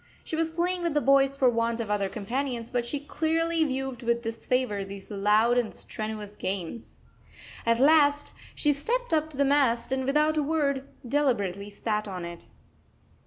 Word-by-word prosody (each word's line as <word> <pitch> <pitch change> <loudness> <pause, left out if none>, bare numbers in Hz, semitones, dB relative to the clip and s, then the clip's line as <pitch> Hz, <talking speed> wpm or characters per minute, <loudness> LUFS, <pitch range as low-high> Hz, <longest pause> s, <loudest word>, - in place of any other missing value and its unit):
She - - -4
was 325 0 +1
playing 350 +2 -1
with 340 -3 -1
the - - +5
boys 275 -1 +4
for 270 -2 +3
want 230 -1 +1
of 220 -3 -3
other 200 -2 0
companions, 235 +3 -3
but 240 -1 -1
she 285 +4 -2
clearly 325 +2 0
viewed 265 -3 -3
with 235 0 0
disfavour 225 -2 -1
these 195 +1 -9
loud 210 +4 +3
and 235 -3 -3
strenuous 215 -1 -6
games. 190 +3 -5 0.7
At 230 0 +3
last 290 0 +4 0.2
she 295 -1 +2
stepped 485 - -2
up 315 0 +2
to 295 - -11
the 280 - +3
mast 270 -4 +2
and, 265 0 0
without 300 +3 +2
a - - +3
word, 280 -3 0 0.2
deliberately 205 -8 0
sat 210 +1 -2
on 180 -3 -5
it. 170 0 -9
255 Hz, 170 wpm, -27 LUFS, 215-295 Hz, 0.7 s, the